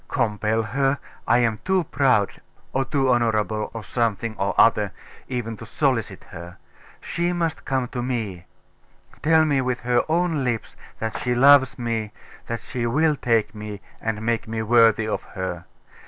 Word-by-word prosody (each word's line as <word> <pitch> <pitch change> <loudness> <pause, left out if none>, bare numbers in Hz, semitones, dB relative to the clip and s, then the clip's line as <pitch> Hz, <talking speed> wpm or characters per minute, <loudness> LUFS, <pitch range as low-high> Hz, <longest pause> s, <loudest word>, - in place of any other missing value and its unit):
Compel 110 +1 0
her? 135 +5 0 0.3
I 120 - +5
am 115 -3 +1
too 190 -1 +2
proud, 130 -9 +1 0.3
or 135 +1 +1
too 135 +1 0
honourable, 110 -3 +1
or 115 -1 -7
something 115 0 -1
or 100 0 -1
other, - - +4 0.3
even 120 -3 -3
to 115 - -9
solicit 115 -6 -1
her. 85 0 -10 0.4
She 175 +1 -1
must 165 -2 -2
come 130 -2 0
to 125 - -4
me; 110 -8 -3 0.7
tell 160 +1 +4
me 140 -3 +2
with 125 -1 -2
her 120 0 +2
own 165 -3 +1
lips 120 -3 -2 0.2
that 110 0 -3
she 125 -1 0
loves 135 +1 +6
me, 115 -3 -2 0.4
that 115 0 -3
she 120 -2 -3
will 150 +5 +2
take 115 -5 +1
me, 105 -1 -7 0.2
and 110 -1 -2
make 115 -1 -1
me 110 0 -3
worthy 115 -1 +4
of 110 - -2
her. 95 -3 -6
115 Hz, 160 wpm, -23 LUFS, 110-135 Hz, 0.7 s, loves